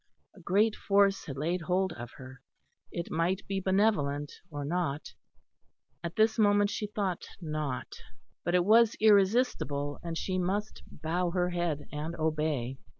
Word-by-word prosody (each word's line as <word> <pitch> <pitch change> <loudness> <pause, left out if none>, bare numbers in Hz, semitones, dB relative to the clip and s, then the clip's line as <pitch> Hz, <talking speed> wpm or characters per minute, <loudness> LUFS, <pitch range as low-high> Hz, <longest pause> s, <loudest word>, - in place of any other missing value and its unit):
A 205 - -16
great 205 +5 +2
Force 200 -1 +2
had 140 -2 -5
laid 170 +5 -1
hold 185 +2 0
of 120 0 -8
her, 130 -1 -11 0.5
it 170 - -5
might 175 +4 0
be 195 -1 -2
benevolent 185 -8 +1 0.2
or 145 -2 -5
not 155 -2 -2 0.9
at 170 0 -4
this 220 +1 +3
moment 205 -1 +4
she 210 +1 -3
thought 200 -4 -3
not 155 -6 -4 0.5
but 175 +1 +1
it 175 -1 +3
was 225 +2 +5
irresistible; 200 - +3
and 165 -1 -4
she 185 +2 -1
must 200 +4 -2
bow 175 +3 -2
her 180 0 0
head 170 -4 -2
and 155 +3 -4
obey. 150 -5 -1
175 Hz, 150 wpm, -30 LUFS, 150-200 Hz, 0.9 s, was